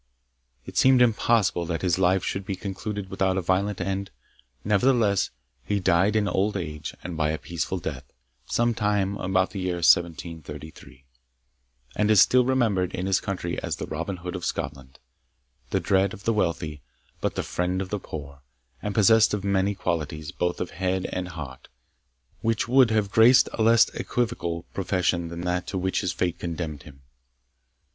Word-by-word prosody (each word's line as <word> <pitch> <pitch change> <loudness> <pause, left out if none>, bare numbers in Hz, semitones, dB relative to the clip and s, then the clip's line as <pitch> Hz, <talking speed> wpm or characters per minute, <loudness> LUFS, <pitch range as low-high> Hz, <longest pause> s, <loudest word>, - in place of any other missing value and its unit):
It - - -8
seemed 130 -1 +6
impossible 110 -7 +2
that 85 0 -3
his 90 0 +1
life 95 0 +3
should 95 0 -3
have 95 -2 -3
concluded 100 0 -5
without 95 0 +1
a - - +1
violent 95 +3 0
end. 95 +1 -2 0.5
Nevertheless 105 -1 +2 0.3
he 105 -1 -1
died 95 +3 +2
in 105 -2 +2
old 100 +1 0
age 75 -4 -5
and 90 -2 -5
by 80 -1 +1
a 80 - -1
peaceful 80 -7 -3
death, - - -6 0.4
some 120 0 +1
time 105 -2 0
about 95 0 0
the 100 - -5
year 90 -1 -1
1733, 80 -5 -1 0.9
and 105 0 +1
is 105 -2 +6
still 125 +5 +6
remembered 110 -8 +1
in 90 - -3
his 95 -1 +2
country 90 -3 -4
as - - -2
the - - -5
Robin 85 +5 -4
Hood 90 +1 -6
of 90 - -6
Scotland 65 -1 -4 0.7
the - - +1
dread 95 0 +1
of 100 - -15
the 115 - +1
wealthy, 85 -7 -1 0.4
but - - -2
the - - -1
friend 90 +1 -1
of 95 -1 -4
the 105 - -1
poor 70 -5 -8 0.4
and 105 -1 -4
possessed 110 0 +5
of 100 - -5
many 100 0 +1
qualities, 80 -3 -3
both 90 0 -2
of 90 - -3
head 95 0 -1
and 90 0 -3
heart, 70 -7 -8 0.7
which 115 0 0
would 130 0 +5
have 105 -3 +1
graced 115 +4 +6
a - - -2
less 115 +1 +6
equivocal 85 -9 -2
profession 90 -2 0
than 85 +1 -6
that 90 0 -2
to 95 - -3
which 95 0 0
his 90 - -1
fate 90 -1 -2
condemned 80 -4 -4
him. 70 -2 -15
95 Hz, 170 wpm, -25 LUFS, 85-105 Hz, 0.9 s, seemed